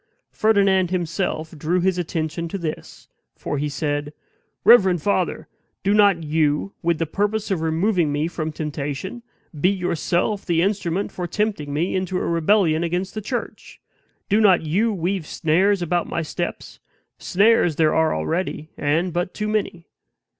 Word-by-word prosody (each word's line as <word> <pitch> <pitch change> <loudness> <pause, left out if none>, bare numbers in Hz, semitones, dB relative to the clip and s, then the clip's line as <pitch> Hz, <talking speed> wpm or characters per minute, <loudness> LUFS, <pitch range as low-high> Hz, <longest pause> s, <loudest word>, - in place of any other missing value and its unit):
Ferdinand 195 -4 +3
himself 170 -2 -2
drew 160 +4 0
his 180 0 +1
attention 165 0 -3
to 180 - -4
THIS; 165 -4 -6 0.3
for 145 - -4
he 150 +1 -1
said: 145 0 -2 0.5
"Reverend 190 -7 +6
father! 205 - 0 0.4
do 200 +1 +2
not 200 -5 +4
you, 150 +3 0
with 170 -1 +1
the 165 - -1
purpose 205 +5 -1
of 180 -4 0
removing 165 0 +1
me 145 +2 0
from 160 -2 -4
temptation, 150 - -5 0.3
be 155 +4 +2
yourself 185 +1 -1
the 170 -1 +1
instrument 195 -1 -1
for 180 -1 -4
tempting 200 -6 -2
me 160 +7 -1
into 185 -1 -1
a - - -2
rebellion 170 -1 +2
against 180 +3 -2
the 215 - -4
church. 235 +2 -6 0.5
Do 210 +2 +3
not 190 -6 +5
you 195 +9 +1
weave 185 -3 -2
snares 185 +4 +1
about 175 0 -1
my 170 - -2
steps; 155 - -5 0.4
snares 200 -4 +3
there 155 0 +3
are 160 - +2
already, 155 - -3
and 160 +5 0
but 175 +1 -2
too 210 - -2
many." 200 -5 -2
175 Hz, 155 wpm, -22 LUFS, 160-195 Hz, 0.5 s, Reverend